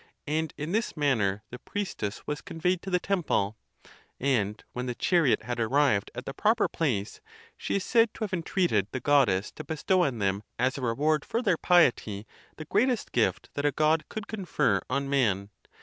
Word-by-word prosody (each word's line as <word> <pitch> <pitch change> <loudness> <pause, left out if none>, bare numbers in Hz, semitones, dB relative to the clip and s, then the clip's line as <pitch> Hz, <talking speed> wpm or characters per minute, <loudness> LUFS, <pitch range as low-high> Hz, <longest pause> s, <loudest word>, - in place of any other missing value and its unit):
And 155 +1 -1
in 150 +3 -4
this 220 -4 -1
manner 110 -9 +1
the 125 - -7
priestess 190 - -4
was 150 0 -3
conveyed 180 +2 -1
to 195 - -6
the 180 -1 +2
temple; 160 - 0 0.6
and 110 -6 0
when 125 +1 -4
the 125 - -3
chariot 165 -1 +2
had 120 -1 -4
ar 110 -1 0
rived 135 -8 +2
at - - -6
the 135 - -5
proper 220 +7 +2
place, 115 -11 -2 0.3
she - - -3
is 200 - 0
said 230 -2 +3
to - - -4
have 205 -3 -4
entreated 170 - +1
the 130 - -4
Goddess 120 -9 +3
to - - -8
bestow 175 +4 +1
on 135 -7 -1
them, 100 -1 0 0.2
as 130 +2 +1
a 140 - -5
reward 145 +5 +1
for 230 +2 -2
their 200 -7 +3
piety, 120 - +2 0.3
the 155 - -7
greatest 245 - +1
gift 95 -5 0
that 145 - -3
a 145 - +3
God 155 +1 +1
could 215 -2 -5
confer 185 - 0
on 140 +1 -1
man. 105 -8 +1
145 Hz, 190 wpm, -28 LUFS, 115-180 Hz, 0.6 s, said